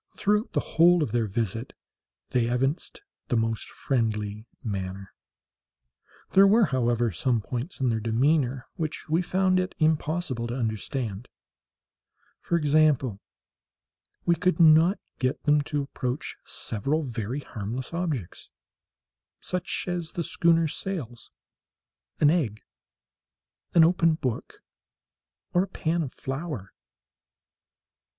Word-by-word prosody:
Throughout 210 +3 +1
the - - +2
whole 175 0 +4
of 120 - -3
their 115 -1 +1
visit 115 +3 -3 0.6
they 120 -2 +2
evinced 135 - -1 0.2
the 125 - +1
most 115 -1 -1
friendly 110 -4 -2 0.2
manner. 95 -2 -5 1.2
There 195 +1 +7
were, 220 +2 +5
however, 120 - +1
some 120 +6 +1
points 125 - -5
in 130 -2 +2
their 110 -1 0
demeanour 125 +3 +1
which 155 -2 -4
we 165 +3 +3
found 185 +1 +2
it 185 0 -2
impossible 155 -5 0
to 120 - -4
understand; 110 -1 -3 1.1
for 170 - +1
example, 145 -8 +2 1.0
we 170 - +4
could 180 +3 +1
not 165 +4 +6 0.2
get 130 0 -1
them 150 0 +4
to 145 -2 0
approach 130 -1 -4
several 140 +9 -1
very 120 +1 -4
harmless 120 +4 -5
objects—such 170 - -6
as 175 -2 -3
the 170 - -2
schooner's 165 -1 +2
sails, 140 - -5 0.9
an 150 -1 +6
egg, 125 - -1 1.1
an 165 - +8
open 165 -1 +4
book, 130 -7 -4 0.9
or 175 - +4
a 195 - -1
pan 170 -2 -1
of 140 -5 -3
flour. 135 - -5
135 Hz, 115 wpm, -27 LUFS, 115-165 Hz, 1.2 s, an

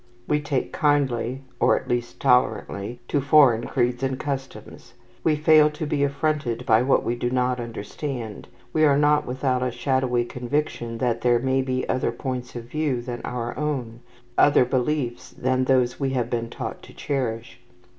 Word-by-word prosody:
We 150 - +2
take 145 -3 -2
kindly, 135 -5 +1 0.2
or - - +4
at - - -15
least 120 0 -2
tolerantly, 120 -3 +1
to 145 - 0
foreign 135 -5 +5
creeds 120 +1 0
and 135 -1 -1
customs. 130 -4 -6 0.3
We 155 - +3
fail 155 0 +5
to 150 +1 -5
be 145 -1 0
affronted 140 -4 -1
by 110 -1 +4
what 130 +2 +2
we 120 - -1
do 120 0 -2
not 125 0 0
understand. 115 0 -6 0.3
We 155 - +3
are 145 -2 +5
not 150 0 +3
without 130 0 0
a 125 - 0
shadowy 125 0 0
conviction 120 -2 -3
that 120 -1 0
there 120 -1 +4
may 130 +2 +1
be 130 -1 -2
other 130 - 0
points 125 -2 -5
of 120 - -5
view 140 +1 -1
than 120 -1 -5
our 120 -1 -4
own, 130 -6 -3 0.4
other 145 -3 +6
beliefs 130 -1 -1
than 130 0 +1
those 125 -2 +2
we 135 -2 0
have 125 -2 -1
been 115 -1 -2
taught - - -6
to - - -15
cherish. 120 -4 -3
130 Hz, 170 wpm, -24 LUFS, 120-140 Hz, 0.4 s, other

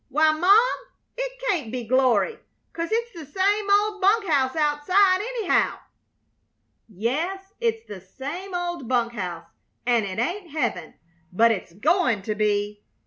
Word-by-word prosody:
Why, 310 +3 +4
Mom, 410 +10 +3 0.3
it - - -3
can't 310 - -1
be 250 -1 -4
glory, 255 - +2 0.3
'cause 335 0 -3
it's 470 +1 0
the 335 -4 -9 0.2
same 410 +2 +2
old 410 0 +2
bunk 410 +3 +3
house 275 -5 +1
outside, 365 +6 +3
anyhow." 455 -3 0 1.1
"Yes, 325 - -3
it's 455 -1 -1
the 200 -3 -9
same 295 - -7
old 345 -7 -3
bunk 240 -1 0
house, 175 -6 -5 0.4
and 240 -2 +2
it 195 -1 -5
ain't 345 - -2
heaven, 185 - -3 0.4
but 230 +5 +4
it's 190 -5 -4
goin' 245 - +1
to 215 - -2
be. 210 0 -1
310 Hz, 140 wpm, -24 LUFS, -, 1.1 s, Why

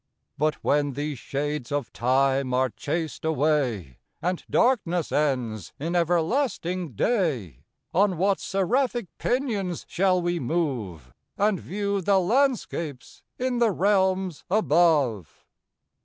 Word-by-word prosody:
But 155 +1 +1
when 145 -1 +1
these 145 -1 -4
shades 145 -1 -3
of 145 -4 -2
time 130 +1 +1
are 130 -1 +2
chas'd 150 - -4
away, 140 - 0 0.2
And 180 +1 -2
darkness 180 - +2
ends 125 - -1
in 165 +5 -2
everlasting 175 - 0
day, 120 - -1 0.3
On 190 0 +3
what 195 +2 +2
seraphic 240 +3 -1
pinions 215 - -1
shall 185 0 +2
we 175 0 -1
move, 120 - -3 0.2
And 205 -2 +2
view 200 +1 -2
the 195 +1 +3
landscapes 190 - -1 0.2
in 250 -1 -1
the 235 -2 +4
realms 190 -3 +1
above? 155 - +2
165 Hz, 110 wpm, -25 LUFS, 135-195 Hz, 0.3 s, the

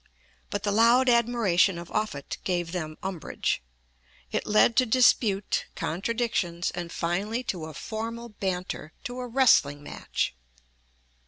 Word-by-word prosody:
But 205 - -3
the 205 - +1
loud 235 +4 +5
admiration 225 -7 +3
of 170 0 -8
Offutt 210 -10 -3
gave 175 -2 -1
them 155 -4 -4
umbrage. 185 - -2 0.7
It - - -2
led 215 +2 +4
to 255 - +6
dispute, 220 -4 +3
contradictions, 180 -2 -1
and 175 -1 -5
finally 200 +9 -1
to 180 -8 -3
a 160 -2 -9
formal 230 +4 -5
banter 185 -6 -4
to 245 +1 -5
a 250 - -4
wrestling 225 - +4
match. - - -3
200 Hz, 130 wpm, -27 LUFS, 175-235 Hz, 0.7 s, to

